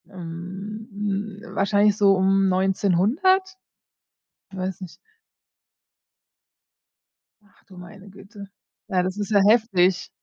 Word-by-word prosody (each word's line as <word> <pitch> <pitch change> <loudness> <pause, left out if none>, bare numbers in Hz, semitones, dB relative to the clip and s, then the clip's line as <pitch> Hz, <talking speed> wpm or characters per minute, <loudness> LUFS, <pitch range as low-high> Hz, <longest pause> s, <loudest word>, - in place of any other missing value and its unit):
Ähm, 190 +4 -8
hm, 205 +1 -5
wahrscheinlich 205 +1 +2
so 200 -2 +4
um 195 +1 +2
1900? 205 - +1 0.9
Weiß 190 -1 -5
nicht. 185 -3 -10 2.5
Ach - - -30
du 185 - -16
meine 195 +3 -13
Güte. 200 +1 -13 0.4
Ja, 185 -4 0
das 185 +2 -4
ist 205 0 -4
ja 205 - +4
heftig. 190 -5 +2
195 Hz, 100 wpm, -23 LUFS, 185-210 Hz, 2.5 s, so